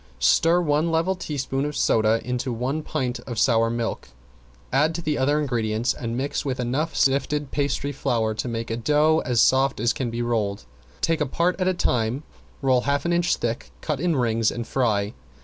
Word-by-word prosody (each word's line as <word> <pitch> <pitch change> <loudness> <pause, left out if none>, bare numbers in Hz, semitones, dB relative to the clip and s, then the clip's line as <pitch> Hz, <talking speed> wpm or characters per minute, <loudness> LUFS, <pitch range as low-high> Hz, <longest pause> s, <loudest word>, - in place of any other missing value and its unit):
Stir 165 - +4
one 155 0 +1
level 165 +3 +1
teaspoon 140 -6 -3
of 150 0 -3
soda 110 0 +3
into 125 +1 -2
one 130 +6 -2
pint 130 -5 -3
of 120 -3 -5
sour 115 -1 +3
milk, 115 0 -3 0.6
add 150 +4 +3
to 170 - -3
the 150 -1 0
other 145 +3 +2
ingredients 115 -4 0
and 115 0 -4
mix 140 +2 -2
with 130 -2 -3
enough 130 +7 -1
sifted 140 +1 +1
pastry 140 0 -1
flour 115 -5 0
to 110 - -3
make 115 -1 -4
a 115 - -1
dough 150 +6 +3
as 120 -2 +2
soft 135 -2 +3
as 115 +1 +2
can 130 -3 -3
be 120 +1 -3
rolled. 105 - -1 0.4
Take 165 -1 +1
a 150 - +1
part 175 +7 0
at 185 - +2
a 185 - +3
time, 125 -2 0 0.4
roll 130 -2 +3
half 140 +3 0
an 170 - +1
inch 175 0 +2
thick, 115 0 -3
cut 150 -4 -2
in 170 0 +1
rings 115 -3 +2
and 120 -1 -4
fry. 105 -6 0
130 Hz, 195 wpm, -24 LUFS, 115-150 Hz, 0.6 s, Stir